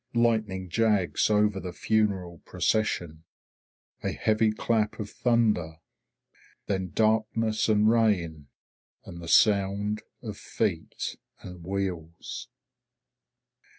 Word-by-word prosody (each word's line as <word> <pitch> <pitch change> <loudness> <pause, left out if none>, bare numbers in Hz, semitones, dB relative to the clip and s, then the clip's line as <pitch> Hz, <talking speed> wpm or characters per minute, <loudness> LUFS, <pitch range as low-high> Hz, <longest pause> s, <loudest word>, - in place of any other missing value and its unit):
Lightning 110 -5 +1
jags 105 -1 +2
over 105 -2 +2
the 90 -1 -6
funeral 95 -5 0
procession. 85 -7 -1 0.8
A - - 0
heavy 110 0 +2
clap 110 0 0
of 105 -1 -5
thunder. 110 -9 +1 0.9
Then 95 -2 -2
darkness 110 0 +1
and 105 0 +4
rain, 90 -10 +1 0.6
and 85 - -9
the 85 - -8
sound 100 +2 +3 0.2
of - - -6
feet - - -3 0.2
and 90 -2 -10
wheels. 95 +3 -4
105 Hz, 95 wpm, -27 LUFS, 90-110 Hz, 0.9 s, and